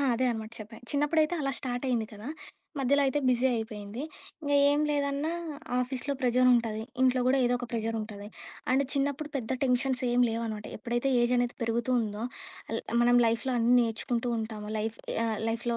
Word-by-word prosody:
ఆ! - - +1
అదే 255 +2 +1
అనమాట 220 -1 -5
చెప్పా. 220 +1 -9
చిన్నప్పుడైతే 305 +3 +2
అలా 275 - 0
స్టార్టయింది 245 -3 -1
కదా! 210 +6 -8 0.5
మధ్యలో 280 +2 +3
అయితే 270 +2 +1
బిజీ 250 +1 +3
అయిపోయింది. 220 +1 -5 0.4
ఇంగ 285 0 -1 0.2
ఏం 290 +1 +3
లేదన్నా 285 +2 0 0.5
ఆఫీస్‌లో 255 +2 -1
ప్రెజరుంటాది, 240 -3 +3 0.2
ఇంట్లో 255 -1 +4
కూడా 265 +1 +4
ఏదో 245 0 +3
ఒక 245 - -5
ప్రెజరుంటాది. 220 -2 -3 0.4
అండ్ 265 +2 +4
చిన్నప్పుడు 285 +1 -1
పెద్ద 235 -3 -4
టెన్షన్స్ 255 0 +1
ఏం 245 +1 +3
లేవనమాట. 225 -2 -3
ఎప్పుడైతే 240 +3 -1
ఏజ్ 240 +1 +2
అనేది 245 0 +1
పెరుగుతూ 230 +2 0
ఉందో 210 -1 -3 0.5
అల్ 225 - -1 0.2
మనం 245 0 +5
లైఫ్‌లో 230 +3 0
అన్నీ 235 +2 +4
నేర్చుకుంటూ 235 +1 -1
ఉంటాము. 220 -1 -5
లైఫ్, 220 +1 -2 0.3
ఆహ్, 220 -2 -1
లైఫ్‌లో 235 +1 -1
245 Hz, 160 wpm, -29 LUFS, 225-265 Hz, 0.5 s, మనం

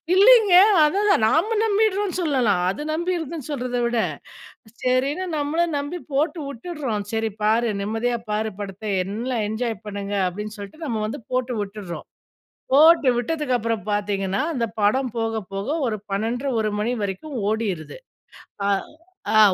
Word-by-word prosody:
இல்லைங்க 425 0 +7 0.3
அததான் 395 +7 +2
தான் 225 - +3
நாம 345 - +2
நம்பிட்றோம்னு 415 -3 +1
சொல்லலாம். 250 - +2
அது 195 +9 -3
நம்பிர்துன்னு 330 -3 -2
சொல்றத 250 -4 -2
விட. 235 0 0 0.9
சரின்னு 270 +7 +1
நம்மளும் 315 +3 0
நம்பி 290 +5 -4
போட்டு 310 +5 +1
விட்டுர்றோம். 270 -5 -4
சரி 225 0 0
பாரு 225 +2 +3
நிம்மதியா 225 +4 -1
பாரு 215 +1 0
படத்த. 200 +1 -7 0.2
என்லாம் 220 +4 -2
என்ஜாய் 225 0 -2
பண்ணுங்க 205 0 -4
அப்டின்னு 210 +4 -5
சொல்லிட்டு 205 +11 -9
நம்ம 230 -7 -2
வந்து 240 +7 -5
போட்டு 250 -1 0
விட்டுர்றோம். 200 -3 -6 0.7
போட்டு 310 0 +7
விட்டதுக்கப்புறம் 240 - -1
பார்த்தீங்கன்னா, 200 -2 -1
அந்த 235 -5 0 0.2
படம் 245 +5 +2
போக 225 -1 -1
போக 195 +1 -3 0.2
ஒரு 215 -2 -1
12:30 235 +7 -1
1:00 215 - 0
மணி 235 +4 0
வரைக்கும் 205 +10 -5
ஓடிருது. 210 - -2 0.7
அ - - +2 0.7
ஆ - - +8
240 Hz, 135 wpm, -23 LUFS, 210-300 Hz, 0.9 s, ஆ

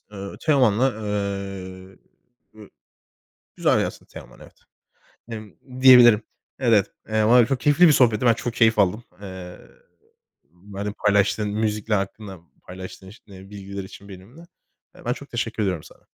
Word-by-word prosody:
Eee, 100 -1 -8
Teoman'la, 130 -4 +2
eee, 100 -3 -5 0.7
e - - -14 0.9
güzel - - +2
yazsın - - -5
Teoman, - - -14
evet, - - -16 0.8
emm, 110 - -10
diyebilirim. 120 -4 +7 0.4
Evet, 115 -6 +3 0.2
eee, 110 0 +1
var 120 +3 +6
ya, 120 - +5
çok 135 -1 -2
keyifli 150 +7 +5
bir - - +6
sohbetti, 120 -5 +3
ben 115 - +6
çok 115 +1 -5
keyif 115 -1 +3
aldım. 100 +5 +1 0.2
Eee, 95 -2 -9 0.9
benimle 100 +5 -8
paylaştığın 105 +1 +2
müzikler 105 0 -1
hakkında 95 0 -6 0.3
paylaştığın 95 +1 -10
ş 110 - -18
bilgiler 100 0 -9
için 100 +1 -13
benimle. 100 - -13 0.6
Ben 120 - +1
çok 140 +2 -9
teşekkür 115 -2 -3
ediyorum 90 -6 -2
sana. - - -18
105 Hz, 135 wpm, -23 LUFS, 95-115 Hz, 0.9 s, diyebilirim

